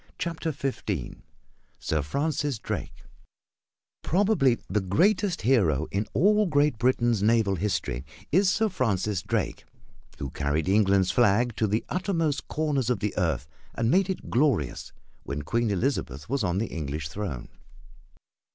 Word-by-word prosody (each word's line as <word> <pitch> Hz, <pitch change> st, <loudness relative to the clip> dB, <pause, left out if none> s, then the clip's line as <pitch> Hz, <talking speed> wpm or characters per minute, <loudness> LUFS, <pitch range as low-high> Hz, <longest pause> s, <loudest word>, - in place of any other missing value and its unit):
CHAPTER 165 Hz, -1 st, -2 dB
XV 135 Hz, -2 st, -4 dB, 0.6 s
SIR 80 Hz, -1 st, -1 dB
FRANCIS 145 Hz, -, -1 dB
DRAKE 75 Hz, -, -5 dB, 1.0 s
Probably 175 Hz, -, +2 dB
the 105 Hz, +2 st, 0 dB
greatest 180 Hz, -, +1 dB
hero 85 Hz, -, +3 dB
in 100 Hz, +2 st, -1 dB
all 210 Hz, -, +4 dB
Great 145 Hz, -6 st, +2 dB
Britain's 120 Hz, -3 st, +2 dB
naval 110 Hz, -2 st, +3 dB
history 85 Hz, -10 st, -2 dB, 0.3 s
is 185 Hz, +4 st, +4 dB
Sir 220 Hz, +3 st, +2 dB
Francis 105 Hz, -, 0 dB
Drake, -, -, -2 dB, 0.5 s
who 70 Hz, -2 st, -5 dB
carried 75 Hz, +3 st, -1 dB
England's 95 Hz, -2 st, +3 dB
flag 120 Hz, 0 st, +3 dB
to 110 Hz, -, +2 dB
the 105 Hz, +3 st, -1 dB
uttermost 165 Hz, -6 st, -1 dB
corners 145 Hz, -6 st, 0 dB
of 125 Hz, -, +2 dB
the 105 Hz, -1 st, -2 dB
earth 80 Hz, -7 st, 0 dB, 0.3 s
and 115 Hz, +1 st, +1 dB
made 190 Hz, +1 st, +3 dB
it 190 Hz, -, -4 dB
glorious 120 Hz, -, +1 dB, 0.3 s
when 70 Hz, +1 st, -5 dB
Queen 115 Hz, +8 st, 0 dB
Elizabeth 90 Hz, -, -2 dB
was 135 Hz, -2 st, -1 dB
on 90 Hz, -1 st, 0 dB
the 110 Hz, -, 0 dB
English 75 Hz, -2 st, -3 dB
throne. 75 Hz, -6 st, -5 dB
115 Hz, 135 wpm, -27 LUFS, 90-150 Hz, 1.0 s, all